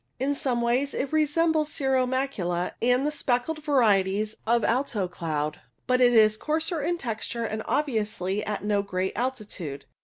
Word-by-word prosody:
In 275 Hz, +3 st, +1 dB
some 255 Hz, -4 st, 0 dB
ways 250 Hz, +4 st, +1 dB
it 280 Hz, +3 st, -2 dB
resembles 310 Hz, 0 st, +2 dB
cirro 265 Hz, -3 st, +1 dB
macula 200 Hz, -10 st, -1 dB
and 250 Hz, +3 st, +3 dB
the 300 Hz, -, +1 dB
speckled 290 Hz, +2 st, -1 dB
varieties 215 Hz, -7 st, +2 dB
of 235 Hz, 0 st, +3 dB
alto 235 Hz, -6 st, 0 dB
cloud, 155 Hz, -4 st, -3 dB, 0.2 s
but 255 Hz, 0 st, +2 dB
it 245 Hz, -1 st, +6 dB
is 215 Hz, -1 st, +5 dB
coarser 320 Hz, +4 st, -1 dB
in 345 Hz, +4 st, 0 dB
texture 235 Hz, -3 st, -4 dB
and 220 Hz, -1 st, -3 dB
obviously 210 Hz, -8 st, -1 dB
at 210 Hz, -1 st, -3 dB
no 205 Hz, -1 st, +1 dB
great 190 Hz, -1 st, -2 dB
altitude. 210 Hz, -, -4 dB
240 Hz, 155 wpm, -26 LUFS, 205-280 Hz, 0.2 s, it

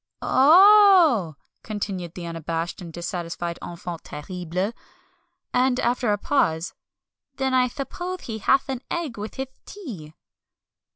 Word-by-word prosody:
"Oh 340 Hz, -, +6 dB
h -, -, -48 dB
h!" -, -, -46 dB
continued 195 Hz, -5 st, -5 dB
the 175 Hz, -, -6 dB
unabashed 165 Hz, +1 st, -4 dB
and 170 Hz, -2 st, -8 dB
dissatisfied 170 Hz, 0 st, -5 dB
enfant 170 Hz, -1 st, -7 dB
terrible. 180 Hz, +6 st, -4 dB, 0.8 s
And, 255 Hz, 0 st, +2 dB
after 240 Hz, -1 st, +1 dB
a 205 Hz, -, +1 dB
pause, 170 Hz, -, 0 dB, 0.6 s
"then 265 Hz, -1 st, -1 dB
I 255 Hz, -1 st, +4 dB
thuppose 350 Hz, +8 st, -5 dB
he 220 Hz, -2 st, -6 dB
hath 270 Hz, +7 st, +2 dB
an 260 Hz, -2 st, -4 dB
egg 315 Hz, -11 st, -3 dB
with 210 Hz, +1 st, -6 dB
hith 265 Hz, 0 st, -5 dB
tea." 205 Hz, -, -9 dB
215 Hz, 130 wpm, -24 LUFS, 170-270 Hz, 0.8 s, Oh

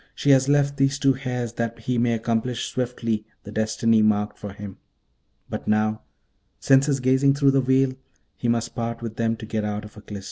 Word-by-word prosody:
she 145 Hz, -, +2 dB
has 135 Hz, 0 st, +4 dB
left 140 Hz, -1 st, +2 dB
these 135 Hz, +1 st, +2 dB
two 135 Hz, -1 st, +3 dB
hairs 125 Hz, -3 st, -4 dB
that 115 Hz, -1 st, -3 dB
he 120 Hz, +1 st, -2 dB
may 120 Hz, 0 st, +2 dB
accomplish 115 Hz, +2 st, -1 dB
swiftly 115 Hz, -3 st, -2 dB, 0.2 s
the 105 Hz, -, -9 dB
destiny 110 Hz, +1 st, +2 dB
marked 105 Hz, -1 st, +1 dB
for 105 Hz, -, -8 dB
him! 100 Hz, -1 st, -9 dB, 0.7 s
but -, -, -6 dB
now, 110 Hz, 0 st, +1 dB, 0.6 s
since 135 Hz, +1 st, +4 dB
his 140 Hz, -2 st, +1 dB
gazing 130 Hz, +2 st, +3 dB
through 140 Hz, -1 st, +4 dB
that 135 Hz, 0 st, +3 dB
veil, 130 Hz, 0 st, +2 dB, 0.4 s
he 120 Hz, -, -3 dB
must 115 Hz, 0 st, 0 dB
part 115 Hz, 0 st, -4 dB
with 115 Hz, -1 st, -6 dB
them 115 Hz, 0 st, +1 dB
to 110 Hz, -, -8 dB
get 110 Hz, 0 st, -2 dB
out 105 Hz, 0 st, -3 dB
of 105 Hz, -, -13 dB
Aklis.' 105 Hz, -1 st, -8 dB
115 Hz, 200 wpm, -24 LUFS, 110-130 Hz, 0.7 s, has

